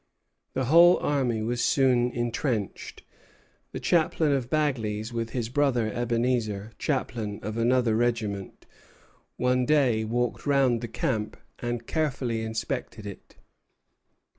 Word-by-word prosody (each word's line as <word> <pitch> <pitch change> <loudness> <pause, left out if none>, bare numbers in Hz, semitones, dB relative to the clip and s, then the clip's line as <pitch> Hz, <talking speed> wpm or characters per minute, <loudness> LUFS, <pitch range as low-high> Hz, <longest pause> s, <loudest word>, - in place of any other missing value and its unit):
The 130 - -1
whole 170 +6 +7
army 125 -6 0
was 120 +2 -1
soon 130 -4 +3
intrenched. 120 -2 -3 0.7
The - - -5
chaplain 160 -2 +2
of 130 -3 0
Bagley's, 115 -7 -1
with 115 -1 -2
his 120 -2 -3
brother 125 -4 +1
Ebenezer, 115 -3 -1
chaplain 115 -7 -2
of 105 +2 -4
another 120 -1 +2
regiment, 110 -5 -2 0.7
one 125 0 +2
day 130 -6 +3
walked 120 +5 -2
round 135 -5 +3
the 120 - -4
camp 110 -1 -2 0.2
and 120 -1 -3
carefully 130 -7 -1
inspected 110 0 -4
it. 100 -2 -10
120 Hz, 115 wpm, -27 LUFS, 110-130 Hz, 0.7 s, whole